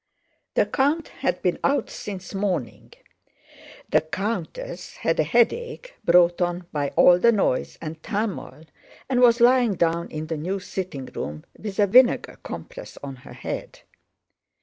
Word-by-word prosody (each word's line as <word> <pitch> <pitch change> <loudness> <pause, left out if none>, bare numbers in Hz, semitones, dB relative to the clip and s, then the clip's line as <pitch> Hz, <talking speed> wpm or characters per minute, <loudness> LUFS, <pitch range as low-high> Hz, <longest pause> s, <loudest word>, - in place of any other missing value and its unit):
The - - +4
count 295 +4 0
had 265 - -2
been 180 - +1
out 275 -3 +1
since 195 -2 -7
morning. 190 - -3 1.0
The - - +5
countess 180 0 -4
had 165 - -1
a - - +5
headache 465 - 0
brought 175 -1 +4
on 175 0 -1
by 145 -2 -1
all 180 0 +7
the 235 +5 +5
noise 195 - 0
and 160 0 -6
turmoil 200 -6 -4 0.4
and 250 -2 +1
was 240 -1 +6
lying 240 -3 +5
down 170 0 0
in 155 0 -5
the 160 0 -3
new 185 +6 -2
sitting 185 -8 -5
room 75 - -6
with 205 -3 -7
a 205 - +5
vinegar 245 +5 +4
compress - - -8
on 135 -2 -6
her 125 - -13
head. - - -6
190 Hz, 150 wpm, -24 LUFS, 165-235 Hz, 1.0 s, all